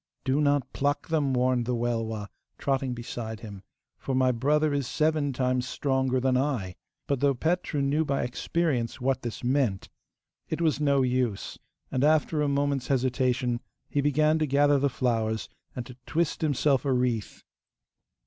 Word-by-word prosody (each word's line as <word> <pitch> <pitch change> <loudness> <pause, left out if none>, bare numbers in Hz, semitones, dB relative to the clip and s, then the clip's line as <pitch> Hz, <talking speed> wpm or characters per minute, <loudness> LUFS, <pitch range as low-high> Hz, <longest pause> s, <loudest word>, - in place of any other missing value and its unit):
'Do 135 +2 +1
not 145 -3 +1
pluck 145 +3 -1
them,' 150 -4 +1
warned 125 -1 +1
the 125 - +1
Welwa, 115 -3 -2 0.3
trotting 135 -2 -1
beside 115 -2 -6
him, 100 -4 -9 0.4
'for 135 - -2
my 130 0 +3
brother 145 +5 +2
is 140 -3 -1
seven 155 -2 +1
times 125 -1 0
stronger 130 -2 0
than 130 0 +1
I'; 125 -9 0 0.3
but 140 -2 0
though 140 0 +3
Petru 160 0 0
knew 145 +3 +2
by 140 -3 -1
experience 125 -1 -1
what 130 +1 0
this 120 0 -6
meant, 125 -6 0 0.6
it - - -2
was 160 -3 +1
no 140 -2 +3
use, 125 -5 -1 0.3
and 130 - 0
after 155 0 +3
a 150 - +2
moment's 140 -1 0
hesitation 125 -2 +1 0.3
he 145 - +1
began 155 +2 +3
to 155 - +1
gather 145 +1 +4
the 140 +1 +2
flowers, 115 -4 -1 0.3
and 125 - -4
to 125 -1 -11
twist 165 -1 0
himself 145 -3 +2
a 140 - 0
wreath. 125 -4 -1
130 Hz, 160 wpm, -27 LUFS, 125-145 Hz, 0.6 s, gather